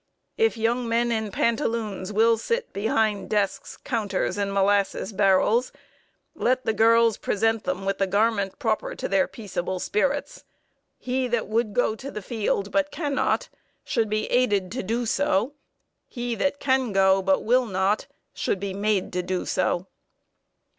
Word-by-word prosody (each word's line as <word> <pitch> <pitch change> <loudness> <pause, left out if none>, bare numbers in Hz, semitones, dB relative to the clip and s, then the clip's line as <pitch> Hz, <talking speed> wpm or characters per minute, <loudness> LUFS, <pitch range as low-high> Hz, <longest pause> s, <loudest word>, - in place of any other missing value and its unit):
If 450 - +2
young 235 +2 0
men 235 +1 +1
in 220 -2 -1
pantaloons 220 -3 -1
will 225 +2 +4
sit 465 - -3
behind 215 0 0
desks, 205 -2 -1
counters, 210 -7 -2
and 200 -1 -1
molasses 200 +1 +1
barrels, 205 +5 +3 0.6
let 255 +1 0
the 220 - +1
girls 230 0 +4
present 225 +1 0
them 185 +1 -2
with 195 0 -1
the 195 - +2
garment 200 -1 +1
proper 220 -2 -1
to - - -4
their 195 -1 +2
peaceable 185 -4 -4
spirits. 285 - -1 0.5
He 255 0 -1
that 240 -2 -1
would 220 -1 -1
go 245 -3 +2
to 270 +5 -8
the 210 -7 -7
field, 205 -2 -1
but 290 0 +1
cannot, 290 -2 -1 0.3
should 225 -2 0
be 215 0 0
aided 205 -7 +2
to 255 - -3
do 230 +5 -2
so; 230 0 +1 0.5
he 240 -1 -4
that 280 +4 -1
can 260 -5 +1
go, 190 0 +4
but 190 0 +1
will 250 +2 +3
not, 195 +1 0 0.3
should 195 - -1
be 195 0 -4
made 200 -1 0
to 180 - 0
do 180 0 -3
so." 175 - 0
220 Hz, 155 wpm, -25 LUFS, 195-240 Hz, 0.6 s, will